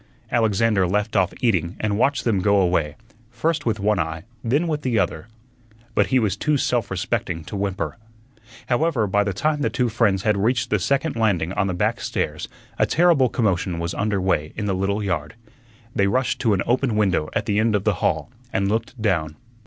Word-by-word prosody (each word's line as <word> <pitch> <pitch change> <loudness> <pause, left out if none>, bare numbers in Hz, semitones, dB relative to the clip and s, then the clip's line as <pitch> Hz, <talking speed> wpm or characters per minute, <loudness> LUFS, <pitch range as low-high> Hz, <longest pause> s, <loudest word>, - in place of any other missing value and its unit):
Alexander 110 -4 +2
left 105 +4 -1
off 95 -1 +3
eating 90 - +1
and 105 -1 0
watched 135 +4 +1
them 110 -5 +1
go 100 +1 +3
away, 85 -5 +1 0.3
first 150 +5 -1
with 110 -3 0
one 105 +1 +1
eye, 80 0 -3 0.2
then 140 +9 +1
with 150 -2 -1
the 125 -5 0
other. 95 +1 -1 0.7
But - - +2
he 130 - +2
was 110 -6 +1
too 150 -1 +1
self 120 -5 0
respecting 90 -3 -2
to 90 - -8
whimper. 100 +3 -3 0.7
However, 130 -2 +1
by 105 +1 +2
the 100 - -1
time 150 +10 0
the - - +1
two 125 -3 0
friends 105 -4 +1
had 105 -2 +2
reached 120 +5 0
the 105 - +2
second 140 - 0
landing 95 -6 +1
on 100 -1 0
the 90 - -2
back - - 0
stairs - - -3 0.3
a - - +3
terrible 165 -7 +4
commotion 95 -7 0
was 85 +1 -3
under 100 +2 0
way 85 -5 0
in 105 - -3
the 100 - 0
little 100 +3 -1
yard. 85 -2 -2 0.6
They 100 -3 +3
rushed 125 +5 0
to 110 -5 +3
an 95 - -1
open 120 -1 +1
window 95 -7 +1
at 105 - -1
the 105 -2 +1
end 110 -1 +2
of 100 - 0
the 110 - +2
hall - - 0 0.2
and 100 0 0
looked 115 +3 -2
down. 85 -8 0
105 Hz, 200 wpm, -22 LUFS, 95-120 Hz, 0.7 s, terrible